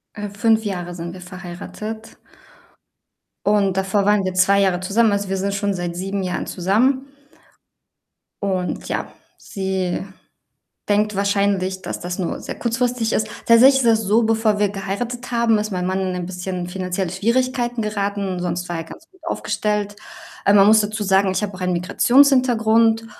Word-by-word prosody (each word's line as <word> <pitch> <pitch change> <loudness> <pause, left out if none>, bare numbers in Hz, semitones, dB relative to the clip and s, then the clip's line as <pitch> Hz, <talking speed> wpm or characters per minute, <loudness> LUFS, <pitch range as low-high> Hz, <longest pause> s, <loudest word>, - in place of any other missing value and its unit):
Äh, 205 -1 -5
5 220 +2 +2
Jahre 175 -3 -4
sind 170 0 -6
wir 185 - -10
verheiratet 190 +5 -8 1.3
und 200 -2 +2
davor 195 +1 +1
waren 205 -1 +3
wir 185 -1 -2
2 195 +2 +4
Jahre 185 -2 +2
zusammen. 210 +3 +2
Also 200 -1 -1
wir 195 - -1
sind 200 +1 -2
schon 200 0 -1
seit 175 -1 -4
7 195 +2 -3
Jahren 180 -1 -3
zusammen 225 +9 +1 1.4
und 185 -2 -2
ja, - - -3 0.2
sie 190 -2 -3 0.9
denkt 210 0 +2
wahrscheinlich, 200 -1 0
dass - - -5
das 180 +1 -5
nur 175 - -2
sehr - - -6
kurzfristig 240 -1 -1
ist. 215 - 0 0.2
Tatsächlich 255 +4 +7
ist 260 - +1
das 225 -1 +3
so, 215 +3 +3
bevor 220 -1 +2
wir 205 -1 +2
geheiratet 230 +6 -5
haben, 235 -2 +3
ist 210 +1 -3
mein 180 -1 -2
Mann 190 +1 -1
in 185 -1 -2
ein 180 -1 -4
bisschen 180 0 -5
finanzielle 185 -1 -3
Schwierigkeiten 240 +4 0
geraten, 200 -3 -2
sonst 175 0 -3
war 170 - -2
er 165 - -4
ganz 325 - -13
gut 375 - -24
aufgestellt. 210 -7 -2 0.5
Ähm, 200 - +5
man 195 0 +7
muss 220 +1 +7
dazu 210 +1 -3
sagen, 195 -1 +3
ich 190 - -1
habe 205 -1 -3
auch 185 - -10
einen 180 0 0
Migrations-Hintergrund 225 +2 +3
200 Hz, 170 wpm, -21 LUFS, 185-220 Hz, 1.4 s, Tatsächlich